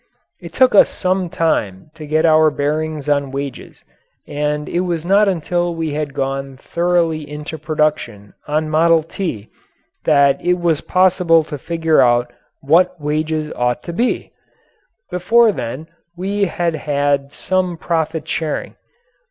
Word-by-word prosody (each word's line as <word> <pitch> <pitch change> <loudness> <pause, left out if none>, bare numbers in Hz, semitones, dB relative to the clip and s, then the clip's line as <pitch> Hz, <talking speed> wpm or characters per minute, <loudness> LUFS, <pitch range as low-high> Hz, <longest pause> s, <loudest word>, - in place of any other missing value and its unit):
It - - -10
took 260 -3 +3
us 200 - +6
some 185 -1 -1
time 150 - -1
to 155 -2 -10
get 155 +2 +2
our 155 -1 +5
bearings 150 0 -2
on 140 -1 +1
wages, 140 0 -7 0.4
and 150 0 -2
it 175 - -1
was 170 -3 -2
not 200 +3 +4
until 175 0 -1
we 165 -2 -3
had 145 -1 -4
gone 135 0 -3
thoroughly 170 0 0
into 150 +1 -7
production 150 -10 -2
on 155 +1 0
"Model 160 +1 +3
T," 160 - -5 0.5
that 140 -1 +3
it 180 0 +2
was 170 -4 0
possible 180 -3 +3
to 150 -1 -7
figure 165 +1 +1
out 120 0 +2 0.3
what 175 +5 +3
wages 155 +1 -2
ought 125 0 -1
to 170 - -6
be. 240 +8 -1 0.8
Before 220 +6 +4
then 145 - -6 0.3
we 200 +2 0
had 175 -2 -1
had 145 -2 -1
some 185 0 -1
profit 160 -1 -2
sharing. 155 -2 -3
155 Hz, 140 wpm, -18 LUFS, 145-175 Hz, 0.8 s, us